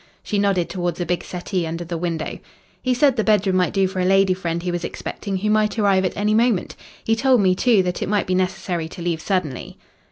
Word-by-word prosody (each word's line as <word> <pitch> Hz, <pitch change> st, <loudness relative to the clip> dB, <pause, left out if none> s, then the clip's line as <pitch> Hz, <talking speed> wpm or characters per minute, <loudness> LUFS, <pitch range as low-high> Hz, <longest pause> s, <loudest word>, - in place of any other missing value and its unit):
She 205 Hz, -, -1 dB
nodded 195 Hz, -4 st, +1 dB
towards 175 Hz, -2 st, -3 dB
a 175 Hz, -, -1 dB
big 175 Hz, 0 st, -1 dB
settee 180 Hz, -1 st, -3 dB
under 165 Hz, +2 st, -4 dB
the 170 Hz, +1 st, -4 dB
window. 165 Hz, -2 st, -3 dB, 0.4 s
"He 255 Hz, -1 st, +1 dB
said 270 Hz, 0 st, +4 dB
the 220 Hz, -, +2 dB
bedroom 205 Hz, -3 st, +2 dB
might 180 Hz, -1 st, +2 dB
do 195 Hz, -1 st, +2 dB
for 185 Hz, 0 st, -5 dB
a -, -, +1 dB
lady 195 Hz, 0 st, +4 dB
friend 170 Hz, -2 st, -3 dB
he 180 Hz, -, -1 dB
was 175 Hz, 0 st, -3 dB
expecting 195 Hz, -2 st, -4 dB
who 210 Hz, +3 st, 0 dB
might 215 Hz, 0 st, +1 dB
arrive 195 Hz, -3 st, +3 dB
at 185 Hz, -, -3 dB
any 210 Hz, +1 st, +1 dB
moment. 225 Hz, -3 st, +1 dB, 0.3 s
He 225 Hz, -, +2 dB
told 255 Hz, +1 st, +3 dB
me, 190 Hz, -2 st, +4 dB
too, 215 Hz, 0 st, +3 dB
that 180 Hz, -1 st, -3 dB
it -, -, -2 dB
might 205 Hz, -1 st, +1 dB
be 185 Hz, -, -1 dB
necessary 185 Hz, -3 st, -1 dB
to 175 Hz, -, -9 dB
leave 170 Hz, -2 st, -1 dB
suddenly." 175 Hz, -10 st, -3 dB
185 Hz, 235 wpm, -21 LUFS, 175-210 Hz, 0.4 s, said